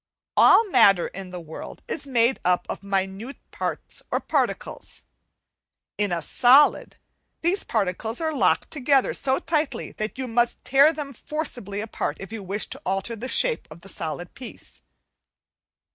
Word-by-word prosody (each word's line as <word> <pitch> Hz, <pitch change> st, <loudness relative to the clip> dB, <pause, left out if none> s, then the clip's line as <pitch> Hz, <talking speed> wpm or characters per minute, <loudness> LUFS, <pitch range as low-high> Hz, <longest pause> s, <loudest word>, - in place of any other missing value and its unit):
All 455 Hz, -, +7 dB
matter 195 Hz, -, +5 dB
in 190 Hz, 0 st, -8 dB
the 180 Hz, 0 st, -7 dB
world 160 Hz, -1 st, -9 dB
is 285 Hz, -, -4 dB
made 240 Hz, -1 st, +2 dB
up 180 Hz, 0 st, +2 dB
of -, -, -5 dB
minute 195 Hz, +5 st, -3 dB
parts -, -, -4 dB
or -, -, 0 dB
particles; -, -, -2 dB, 0.9 s
in 205 Hz, -2 st, 0 dB
a 170 Hz, -2 st, -1 dB
solid 260 Hz, -, +4 dB, 0.4 s
these 360 Hz, +4 st, +1 dB
particles 220 Hz, +2 st, -2 dB
are 320 Hz, -1 st, -1 dB
locked 285 Hz, -, +2 dB
together 275 Hz, -2 st, +2 dB
so 265 Hz, 0 st, +1 dB
tightly 300 Hz, -6 st, -2 dB
that 215 Hz, +4 st, -4 dB
you 260 Hz, -1 st, -3 dB
must 240 Hz, 0 st, 0 dB
tear 275 Hz, +3 st, +6 dB
them 290 Hz, -3 st, -6 dB
forcibly 240 Hz, -, -4 dB
apart 220 Hz, -, -3 dB
if 195 Hz, +1 st, -9 dB
you 225 Hz, -, -5 dB
with 200 Hz, +2 st, -2 dB
to 270 Hz, -, -7 dB
alter 195 Hz, +2 st, -2 dB
the 235 Hz, +3 st, -6 dB
shape 485 Hz, -, +1 dB
of 160 Hz, +2 st, -12 dB
the 195 Hz, -, -11 dB
solid 170 Hz, 0 st, -5 dB
piece. 255 Hz, -, -11 dB
230 Hz, 155 wpm, -24 LUFS, 195-275 Hz, 0.9 s, All